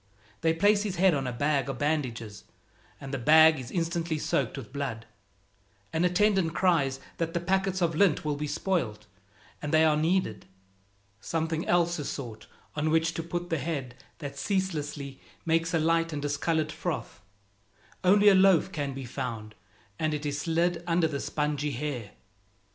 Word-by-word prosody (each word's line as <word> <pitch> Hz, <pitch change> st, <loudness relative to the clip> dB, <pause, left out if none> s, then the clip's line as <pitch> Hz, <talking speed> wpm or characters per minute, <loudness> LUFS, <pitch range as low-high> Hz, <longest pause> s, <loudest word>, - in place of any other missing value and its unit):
They 165 Hz, 0 st, +3 dB
place 205 Hz, +4 st, +4 dB
his 205 Hz, -3 st, -3 dB
head 185 Hz, 0 st, +4 dB
on 135 Hz, -3 st, -1 dB
a -, -, -2 dB
bag 140 Hz, +3 st, 0 dB
of 135 Hz, -, -3 dB
bandages, 120 Hz, -8 st, -2 dB, 0.5 s
and 135 Hz, 0 st, -8 dB
the 135 Hz, -, -1 dB
bag 155 Hz, +3 st, +6 dB
is 125 Hz, -, -7 dB
instantly 170 Hz, -2 st, -1 dB
soaked 140 Hz, -3 st, -1 dB
with 135 Hz, -, -9 dB
blood. 130 Hz, -6 st, -4 dB, 0.9 s
An 160 Hz, -, +1 dB
attendant 185 Hz, -2 st, +2 dB
cries 140 Hz, -8 st, +2 dB, 0.2 s
that 165 Hz, 0 st, -2 dB
the -, -, +2 dB
packets 190 Hz, +1 st, 0 dB
of 165 Hz, -1 st, +1 dB
lint 160 Hz, -2 st, +2 dB
will 150 Hz, -1 st, 0 dB
be 150 Hz, +1 st, -3 dB
spoiled, 140 Hz, -, -2 dB, 0.6 s
and 150 Hz, -, -3 dB
they 160 Hz, 0 st, +5 dB
are 155 Hz, -1 st, +4 dB
needed. 160 Hz, -, 0 dB, 0.7 s
Something 160 Hz, +6 st, -2 dB
else 175 Hz, -1 st, +2 dB
is 145 Hz, -, -3 dB
sought 120 Hz, -6 st, -7 dB, 0.3 s
on 150 Hz, +1 st, 0 dB
which 165 Hz, +1 st, +2 dB
to 165 Hz, -, -3 dB
put 175 Hz, +1 st, -5 dB
the 165 Hz, -, +1 dB
head 140 Hz, -4 st, -3 dB, 0.2 s
that 140 Hz, -2 st, -7 dB
ceaselessly 150 Hz, -7 st, -2 dB, 0.2 s
makes 165 Hz, 0 st, +1 dB
a 170 Hz, -, +2 dB
light 165 Hz, +1 st, +2 dB
and 150 Hz, -, -3 dB
discolored 155 Hz, +2 st, 0 dB
froth. -, -, -4 dB, 0.8 s
Only 205 Hz, +3 st, +5 dB
a -, -, +6 dB
loaf 190 Hz, -1 st, +5 dB
can 140 Hz, -5 st, -3 dB
be 135 Hz, -1 st, -6 dB
found, 110 Hz, -3 st, -5 dB, 0.5 s
and 155 Hz, -1 st, 0 dB
it 150 Hz, 0 st, -5 dB
is 145 Hz, 0 st, -2 dB
slid 170 Hz, +1 st, 0 dB
under 170 Hz, -1 st, +3 dB
the 140 Hz, -3 st, -3 dB
spongy 150 Hz, -1 st, -1 dB
hair. 125 Hz, -5 st, -4 dB
155 Hz, 170 wpm, -28 LUFS, 140-170 Hz, 0.9 s, bag